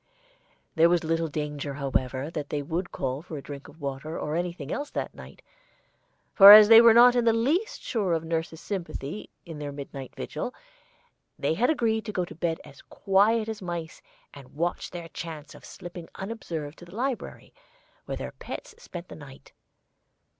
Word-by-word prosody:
There 165 +1 +5
was 175 -1 +2
little 165 +1 0
danger, 150 -2 -4
however, 135 0 -2
that 150 -3 -5
they 145 -1 -2
would 175 +5 -3
call 130 +1 -3
for 165 -2 -8
a - - -6
drink 140 -1 -9
of 165 - -16
water 140 +2 -5
or 150 - -3
anything 170 -4 -3
else 290 +1 -3
that - - -4
night, - - -13 0.9
for 200 0 +11
as 210 0 +11
they 225 0 +10
were 230 -1 +7
not 245 +1 +8
in 245 - +3
the 230 -1 +4
least 290 - 0
sure 200 -7 0
of 165 -1 0
nurse's 165 0 -3
sympathy 180 -3 -5 0.2
in 165 -3 -8
their 145 -1 -5
midnight 140 -2 -8
vigil, 200 +11 -5 0.8
they - - 0
had 235 +9 +2
agreed 225 -7 +1
to 215 - -4
go 180 -3 -1
to - - -11
bed 165 0 -2
as 140 - -14
quiet 215 +3 +2
as 220 -2 -5
mice 170 -3 -5 0.3
and 140 -2 -14
watch 170 +3 -2
their 170 -1 -7
chance 155 -3 -8
of - - -15
slipping 175 -2 -10
unobserved 170 -8 -6
to 175 - -11
the 175 +3 -13
library, 255 +1 -4 0.5
where - - -4
their - - -6
pets - - -8
spent 175 - -9
the - - -10
night. 140 -3 -14
170 Hz, 180 wpm, -27 LUFS, 150-210 Hz, 0.9 s, for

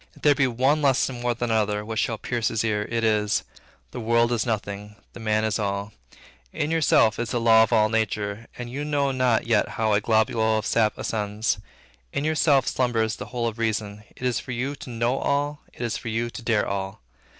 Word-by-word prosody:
If - - -19
there 145 - +6
be 140 -2 +2
one 130 +5 +2
lesson 135 -3 +1
more 120 -1 0
than 120 0 -2
another, 105 -1 0
which 110 0 -3
should 115 - -1
pierce 120 -2 -1
his 110 -1 0
ear, 105 -2 0
it 115 -1 -1
is, 105 -2 +2 0.5
The - - -6
world 115 +1 +2
is 120 -1 0
nothing, 105 -1 -4 0.2
the - - -10
man 110 -1 +1
is 110 +1 0
all; 100 +1 -2 0.6
in 150 +2 -2
yourself 140 -9 +3
is 120 -1 -2
the 120 - 0
law 115 -1 +6
of 115 - +2
all 110 -2 +4
nature, 110 0 -2
and 120 - -5
you 140 +3 -4
know 145 -2 0
not 130 -3 +1
yet 115 -3 +2
how 110 -1 +2
a 105 - +3
globule 110 0 +2
of 110 - -3
sap 110 -2 +2
ascends; 105 0 -1 0.5
in 140 - -2
yourself 150 -3 +3
slumbers 115 -3 0
the - - -7
whole 120 -1 -2
of 115 0 -5
Reason; 105 -2 -2
it - - -12
is 125 -3 +1
for 125 - -6
you 130 +4 -2
to - - -10
know 120 +2 0
all, 145 +1 -1
it - - -8
is 115 - -1
for - - -8
you 115 +1 -1
to - - -8
dare 115 -3 +1
all. 95 -5 -4
115 Hz, 215 wpm, -25 LUFS, 110-125 Hz, 0.6 s, there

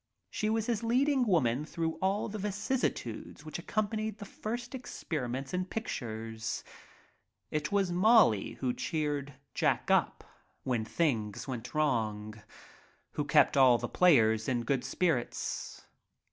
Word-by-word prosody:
She 215 - -1
was 220 0 +1
his 230 -3 0
leading 255 +2 +2
woman 140 - +2
through 160 +1 -3
all 195 +2 +1
the 215 0 -5
vicissitudes 205 - -2
which 155 - -5
accompanied 215 +3 -2
the 220 +3 -5
experiments 135 - -4
in 180 0 0
pictures. 115 - -4 0.9
It 150 0 -2
was 195 -3 +2
Molly 180 - +4
who 125 -2 -2
cheered 145 -3 -2 0.2
Jack - - +1
up - - +2 0.4
when 120 -4 -1
things 110 -7 -1
went 125 -1 -6
wrong, 110 -8 0 0.8
who - - -2
kept - - +4
all 130 -3 +7
the - - -3
players 110 -11 +4
in 120 -2 0
good 130 +1 0
spirits. 120 - -2
155 Hz, 125 wpm, -31 LUFS, -, 0.9 s, all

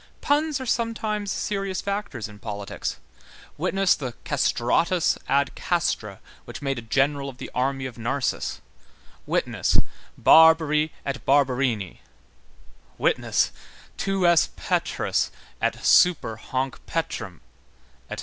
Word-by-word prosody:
Puns 295 0 +1
are 260 - -5
sometimes 220 -3 -1
serious 195 -2 -2
factors 200 - -3
in 105 -1 -14
politics; 100 -2 -5 0.6
witness 195 -1 +2
the 125 -4 -5
Castratus 145 +6 +2
ad 140 0 +2
castra, 115 - -1 0.3
which - - -8
made 135 -3 -2
a - - -7
general 140 +4 0
of 130 - -11
the - - -8
army 135 +1 -1
of 125 -2 -7
Narses; 125 +4 -2 0.7
witness: - - 0 0.4
Barbari 160 -1 +6 0.2
et 140 0 -4
Barberini; 130 -7 +1 1.0
witness: - - +1 0.4
Tu 195 -2 0
es 170 -2 +5
Petrus - - 0 0.3
et - - -1
super 170 -11 +4
hanc 130 +3 -3
petram, 115 - -3 0.7
etc. - - -5
140 Hz, 110 wpm, -25 LUFS, 125-185 Hz, 1.0 s, Barbari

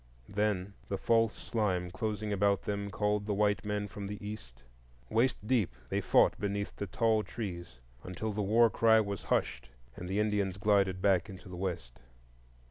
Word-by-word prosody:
Then 100 -1 -1 0.2
the 100 - -1
false 115 +1 +2
slime 95 -6 -1
closing 105 0 -2
about 100 0 +2
them 100 0 -3
called 105 +1 0
the 105 - 0
white 105 -2 +2
men 105 0 -2
from 100 0 -7
the 105 +1 -5
east. 95 - -9 0.5
Waist 115 +4 +2
deep, 110 - +1
they - - 0
fought - - +4
beneath 100 0 -2
the 100 - -4
tall 110 +4 +2
trees, 90 - -6 0.3
until 100 +4 -4
the 105 +1 -2
war 110 +3 +4
cry 110 +1 +5
was 100 -2 -3
hushed 65 0 -1 0.3
and 90 - -7
the 100 +2 0
Indians 105 -3 0
glided 95 -2 +2
back 95 -2 +3
into 95 -2 -10
the 90 - -7
west. 85 -10 -4
100 Hz, 170 wpm, -31 LUFS, 95-105 Hz, 0.5 s, cry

